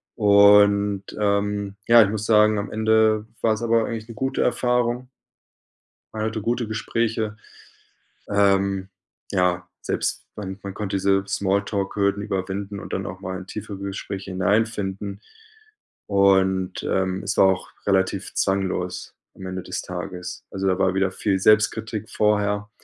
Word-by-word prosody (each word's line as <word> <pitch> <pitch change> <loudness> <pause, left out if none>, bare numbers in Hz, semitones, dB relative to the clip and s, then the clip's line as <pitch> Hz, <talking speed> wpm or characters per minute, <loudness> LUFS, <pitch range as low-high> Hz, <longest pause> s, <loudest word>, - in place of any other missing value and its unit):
Und, 100 -1 +5 0.2
ähm, 100 -1 0
ja, 115 -1 +8
ich 100 - 0
muss 110 0 -3
sagen, 105 -1 +4
am 100 - -5
Ende 110 0 +2 0.2
war 110 - +3
es 110 +2 -5
aber 115 -1 +2
eigentlich 110 -1 -5
'ne - - -7
gute 135 +5 -1
Erfahrung. 125 0 0 1.1
Man 110 0 -2
hatte 110 -1 -3
gute 120 0 -1
Gespräche. 110 -1 -2 0.9
Ähm, 100 -1 +2 0.4
ja, 90 -2 +1
selbst - - -2
man 95 -2 -6
man 100 -1 -6
konnte 100 -2 -4
diese 95 0 +2
Small-Talk-Hürden 100 0 0
überwinden 100 0 -4
und - - -8
dann 95 +1 -2
auch 90 -1 -7
mal 95 -1 -5
in 95 - -10
tiefere 105 0 -7
Gespräche 100 0 -6
hineinfinden. 100 0 -1 0.9
Und, 95 -2 +2
ähm, 95 0 -1
es 100 - -2
war 95 - +6
auch 95 -1 0 0.2
relativ 95 0 0
zwanglos 95 -2 -1 0.2
am 95 - -10
Ende 95 0 -4
des 90 - -4
Tages. 90 0 -6
Also 95 0 -2
da 95 0 +1
war 95 -1 +2
wieder 95 0 +1
viel 95 0 0
Selbstkritik 110 +1 +2
vorher, 105 -1 +1
100 Hz, 140 wpm, -23 LUFS, 95-110 Hz, 1.1 s, ja